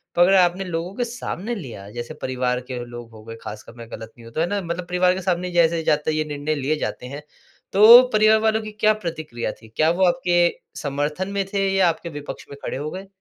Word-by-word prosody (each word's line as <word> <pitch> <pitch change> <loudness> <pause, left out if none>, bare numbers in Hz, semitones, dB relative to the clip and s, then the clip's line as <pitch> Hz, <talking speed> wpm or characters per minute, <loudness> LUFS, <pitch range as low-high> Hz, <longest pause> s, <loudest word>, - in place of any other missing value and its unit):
पर 175 - +3
अगर 190 +2 +6
आपने 180 +1 +3
लोगों 175 +1 -4
के 245 - -1
सामने 235 -1 -5
लिया 115 - -8
जैसे 120 +6 -6
परिवार 125 -1 -1
के 120 -1 -4
लोग 120 -1 -9
हो 110 -1 -13
गए 115 0 -8
ख़ासकर 105 +2 -9
मैं 115 0 -10
ग़लत 110 +1 -8
नहीं 115 - -14
हूँ 115 - -13
तो 160 - -1
है 170 - +1
ना? 205 0 -1
मतलब 170 0 -4
परिवार 180 0 +3
के 190 - -4
सामने 180 0 -1
जैसे 170 -1 +3
जाते 150 +1 +1
ये 155 0 0
निर्णय 150 +1 -2
लिए 145 +2 0
जाते 125 - -4
हैं, 140 +3 -7 0.5
तो 225 +5 +10
परिवार 215 +1 +5
वालों 220 0 +1
की 215 0 -7
क्या 215 0 +3
प्रतिक्रिया 155 - -4
थी? 110 - -16
क्या 155 +1 +3
वो 185 +2 +2
आपके 175 0 +2 0.4
समर्थन 150 +5 -2
में 200 -1 -1
थे 195 -1 +1
या 190 -3 +4
आपके 170 +1 -4
विपक्ष 145 -1 -8
में 140 - -9
खड़े - - -3
हो 150 +2 -4
गए? 190 +1 -7
170 Hz, 235 wpm, -22 LUFS, 135-190 Hz, 0.5 s, तो